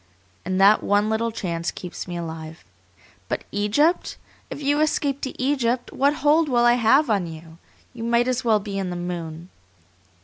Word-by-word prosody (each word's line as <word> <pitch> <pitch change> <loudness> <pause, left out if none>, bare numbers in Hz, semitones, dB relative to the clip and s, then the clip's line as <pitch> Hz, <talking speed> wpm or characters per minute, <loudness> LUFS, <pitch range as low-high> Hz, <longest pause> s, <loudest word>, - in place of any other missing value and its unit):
And 185 0 -2
that 200 +2 +6
one 205 +1 +1
little 230 +1 0
chance 170 -6 -3
keeps 180 0 -7
me 175 -1 -5
alive. 160 -1 -7 0.6
But - - -2
Egypt! 220 - +1 0.3
If - - -6
you 290 +1 +1
escape 285 -2 0
to 265 - -5
Egypt, 255 -2 0
what 285 +2 +2
hold 305 +1 +4
will 240 -2 +3
I 240 - +6
have 245 +5 +4
on 195 -5 +1
you? 160 0 -11 0.3
You 230 -2 -7
might 235 +1 +2
as 255 0 -1
well 220 -3 +3
be 200 -1 -5
in 190 -2 -3
the 175 - -4
moon. 175 -1 -6
220 Hz, 175 wpm, -23 LUFS, 175-260 Hz, 0.6 s, that